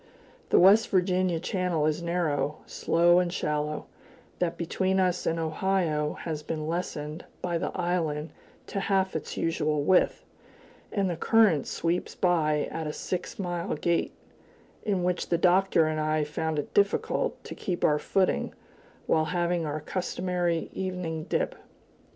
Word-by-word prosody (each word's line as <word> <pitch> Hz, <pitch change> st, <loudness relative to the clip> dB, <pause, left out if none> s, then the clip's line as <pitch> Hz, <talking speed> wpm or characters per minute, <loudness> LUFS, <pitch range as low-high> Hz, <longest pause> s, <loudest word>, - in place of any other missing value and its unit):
The -, -, +5 dB
West 200 Hz, +5 st, +6 dB
Virginia 185 Hz, -2 st, +2 dB
channel 180 Hz, -3 st, 0 dB
is 155 Hz, +2 st, 0 dB
narrow, 165 Hz, -4 st, -1 dB
slow 175 Hz, +1 st, +3 dB
and 180 Hz, -1 st, 0 dB
shallow; 150 Hz, -2 st, -2 dB, 0.5 s
that 175 Hz, -2 st, 0 dB
between 190 Hz, +3 st, 0 dB
us 180 Hz, -1 st, +1 dB
and 165 Hz, -, +1 dB
Ohio 160 Hz, -2 st, 0 dB
has 155 Hz, -3 st, -4 dB
been 155 Hz, 0 st, -4 dB
lessened 160 Hz, -2 st, -3 dB, 0.2 s
by 175 Hz, -2 st, 0 dB
the -, -, -1 dB
island 165 Hz, -4 st, -1 dB, 0.3 s
to 195 Hz, -, -3 dB
half 195 Hz, -2 st, +1 dB
its 160 Hz, -, -4 dB
usual 155 Hz, -3 st, 0 dB
width, 185 Hz, +4 st, +3 dB, 0.7 s
and 200 Hz, -3 st, +1 dB
the 175 Hz, -, -1 dB
current 200 Hz, -5 st, +3 dB
sweeps 170 Hz, +2 st, -2 dB
by 155 Hz, -4 st, +2 dB
at 160 Hz, -1 st, -3 dB
a 150 Hz, -, -3 dB
six 180 Hz, -1 st, -4 dB
mile 175 Hz, -4 st, -2 dB
gait, 170 Hz, +2 st, 0 dB, 0.7 s
in 195 Hz, -4 st, 0 dB
which 180 Hz, 0 st, -1 dB
the 170 Hz, -, +3 dB
Doctor 180 Hz, -1 st, +4 dB
and 155 Hz, 0 st, -1 dB
I 155 Hz, 0 st, +1 dB
found 155 Hz, +1 st, -2 dB
it 145 Hz, -, -4 dB
difficult 200 Hz, 0 st, +1 dB
to -, -, -7 dB
keep 180 Hz, -3 st, -4 dB
our 150 Hz, -1 st, +3 dB
footing 190 Hz, +3 st, 0 dB, 0.5 s
while 155 Hz, 0 st, +2 dB
having 175 Hz, 0 st, 0 dB
our 150 Hz, +1 st, -3 dB
customary 180 Hz, 0 st, -2 dB
evening 180 Hz, -4 st, -3 dB
dip. -, -, 0 dB
170 Hz, 145 wpm, -28 LUFS, 155-180 Hz, 0.7 s, West